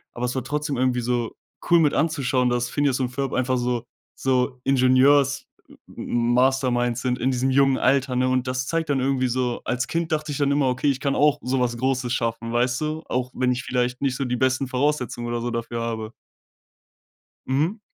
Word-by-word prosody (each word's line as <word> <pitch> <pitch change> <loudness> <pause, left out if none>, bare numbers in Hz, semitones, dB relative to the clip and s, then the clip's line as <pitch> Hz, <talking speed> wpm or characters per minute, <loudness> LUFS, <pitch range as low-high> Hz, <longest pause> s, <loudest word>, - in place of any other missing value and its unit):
aber 120 - -2
es 125 - -2
war 130 - -2
trotzdem 150 +1 -2
irgendwie 125 -1 +1
so 120 -1 -2 0.3
cool 170 0 +6
mit 150 -3 +3
anzuschauen, 135 -5 +1
dass 120 0 -1
Phineas 145 -3 +1
und 130 -2 0
Ferb 135 +1 -3
einfach 130 0 +1
so 120 -1 -1 0.3
so 130 0 0
Ingenieurs-Masterminds 130 -2 +1
sind 125 -1 -1
in 130 +2 0
diesem 130 +1 0
jungen 135 0 +3
Alter, 130 0 +2
ne? 130 +1 +2
Und 130 0 +1
das 130 0 -2
zeigt 165 +1 -1
dann 140 - +1
irgendwie 130 -1 +1
so 125 0 -1
als 125 +1 -1
Kind 165 0 -2
dachte 155 -1 -1
ich 140 - -3
dann 140 -1 +1
immer: 140 -1 +2
„Okay, 125 +3 -1
ich 135 - -4
kann 140 0 -1
auch 150 0 +3
so 130 +1 -1
was 120 -1 0
Großes 130 -1 0
schaffen.“ 115 -1 -2
Weißt 125 +2 +1
du? 155 +1 -2
Auch 125 0 -2
wenn 125 0 +1
ich 125 +1 -2
vielleicht 125 0 -1
nicht 135 -3 0
so 135 - -2
die 125 0 -1
besten 130 +2 +1
Voraussetzungen 130 -2 -1
oder 120 0 -2
so 120 - -2
dafür 115 0 -4
habe. 115 -1 -4 1.3
Mhm. 155 - 0
130 Hz, 195 wpm, -23 LUFS, 125-140 Hz, 1.3 s, cool